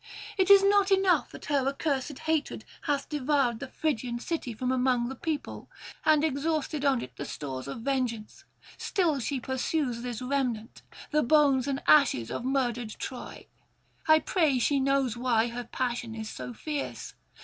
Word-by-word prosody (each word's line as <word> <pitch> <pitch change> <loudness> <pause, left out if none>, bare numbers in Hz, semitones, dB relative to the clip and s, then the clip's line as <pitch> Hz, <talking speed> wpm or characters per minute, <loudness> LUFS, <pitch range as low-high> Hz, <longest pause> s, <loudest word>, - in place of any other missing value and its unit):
It 380 -1 +2
is 395 -1 +9
not 400 0 +4
enough 380 -5 +3
that - - -11
her 280 -3 +1
accursed 275 -1 -1
hatred 315 -2 -2 0.2
hath 285 -2 0
devoured 275 -5 +1
the 275 - -6
Phrygian 250 -5 -2
city 280 0 -3
from 250 +3 -2
among 250 -2 +1
the 265 - -6
people, 310 0 -4 0.3
and 310 -1 +4
exhausted 310 0 -1
on 275 -4 +2
it 125 -1 -10
the - - -4
stores 135 -3 -6
of 140 +11 -6
vengeance; 245 -4 -2 0.4
still 340 -9 +1
she 265 +2 -2
pursues 260 0 -2
this 245 -2 -4
remnant, 250 -4 -2 0.3
the 300 0 +3
bones 280 -1 +4
and 275 0 -2
ashes 270 - +4
of - - -3
murdered 245 -3 -1
Troy. 255 - -7 0.6
I 315 0 +7
pray 315 -4 +1
she 275 +3 +2
know 275 0 +2
why 240 0 +1
her 240 +1 -5
passion 240 -3 -3
is 220 -1 -6
so - - -6
fierce. 295 +4 -5
270 Hz, 160 wpm, -28 LUFS, 240-300 Hz, 0.6 s, is